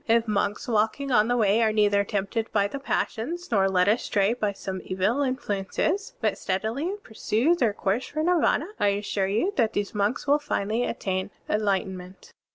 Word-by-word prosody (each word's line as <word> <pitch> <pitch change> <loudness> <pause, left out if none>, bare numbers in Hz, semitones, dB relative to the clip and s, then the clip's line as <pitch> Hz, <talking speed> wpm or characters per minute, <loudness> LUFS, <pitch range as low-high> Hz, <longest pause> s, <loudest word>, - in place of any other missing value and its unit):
If 230 0 +3
monks 205 +1 -1
walking 230 +5 0
on 215 -3 +4
the 245 0 +1
Way 215 0 +3
are 220 -1 +3
neither 205 -1 +3
tempted 205 +3 -2
by 200 -1 +2
the 280 - -6
passions, 310 +6 -3
nor 195 -3 +3
led 180 -1 +2
astray 210 -1 +2
by 215 -4 -1
some 190 -1 -6
evil 195 +9 0
influences, 260 - -1
but - - 0
steadily 225 - -2
pursue 225 +7 +1
their 240 -11 +1
course 205 +4 -1
for 310 +1 -3
Nirvana, 335 -3 +2
I 205 - +3
assure 200 -1 0
you 225 - 0
that 225 -3 +2
these 205 -1 -2
monks 210 +4 0
will 290 +1 +3
finally 230 -4 -1
attain 190 -3 -2 0.2
enlightenment. 190 -3 -2
215 Hz, 170 wpm, -26 LUFS, 200-245 Hz, 0.2 s, on